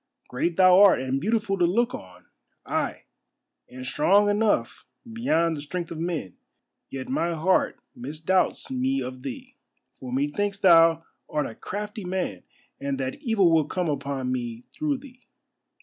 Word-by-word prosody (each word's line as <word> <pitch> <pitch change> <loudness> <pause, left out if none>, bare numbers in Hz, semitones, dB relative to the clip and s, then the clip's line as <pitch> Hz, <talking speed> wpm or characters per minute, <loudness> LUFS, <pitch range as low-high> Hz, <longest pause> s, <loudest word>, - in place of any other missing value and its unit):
Great 165 +7 -1
thou 185 0 +7
art 200 -2 +7
and 130 +1 -2
beautiful 210 0 0
to 175 - +4
look 235 +8 +1
on, 90 -1 -10 0.4
ay, - - -2 0.7
and 130 0 -9
strong 200 +10 +3
enough 210 +1 0 0.3
beyond 170 -8 +1
the 145 - -6
strength 170 +3 -5
of 165 - -6
men, 165 - -3 0.5
yet 130 -1 -6
my 170 +6 0
heart 175 +4 +1 0.2
misdoubts 155 - -1
me 265 +1 0
of 130 0 -6
thee. 260 - -8 0.3
For 130 -1 -10
methinks 150 +10 -1
thou 165 -4 +5 0.3
art 150 - -1
a - - -6
crafty 210 - -6
man, 180 - -3 0.4
and 140 -1 -3
that 130 - -4
evil 220 - +3
will 160 -2 +4
come 180 +2 -2
upon 140 -2 -2
me 120 -2 -4
through 300 -3 -1
thee." 260 -2 -16
170 Hz, 150 wpm, -25 LUFS, 140-205 Hz, 0.7 s, thou